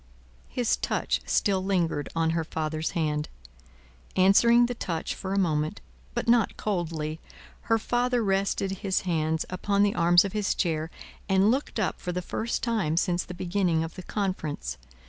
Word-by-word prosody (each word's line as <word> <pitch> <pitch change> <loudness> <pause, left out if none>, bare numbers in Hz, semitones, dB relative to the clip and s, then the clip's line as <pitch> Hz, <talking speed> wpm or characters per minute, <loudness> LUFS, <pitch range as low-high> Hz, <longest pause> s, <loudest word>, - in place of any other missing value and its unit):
His 60 - +1
touch - - -1
still 190 -2 +2
lingered 175 -6 0
on 165 0 +2
her 165 0 0
father's 155 0 -2
hand. 150 -2 -1 0.9
Answering 235 +6 +6
the 245 - -2
touch 170 -8 -3
for 190 - -6
a 195 - 0
moment, 155 -5 0 0.4
but - - -2
not 235 -2 +3
coldly, 165 -6 -2 0.5
her 225 - +5
father 245 +1 0
rested 195 -1 0
his 190 -2 0
hands 160 -3 0
upon 200 +2 +1
the 205 - +2
arms 175 +2 +5
of 195 - -4
his 210 -2 0
chair, 160 -3 -1 0.4
and 195 +2 +4
looked 265 -2 -2
up 215 - -1
for 180 - -3
the 180 0 -3
first 225 +6 -3
time 210 -10 0
since 175 0 +1
the 180 - -8
beginning 175 -2 0
of 165 - -6
the 185 - -8
conference. 185 - -3
185 Hz, 165 wpm, -27 LUFS, 160-200 Hz, 0.9 s, Answering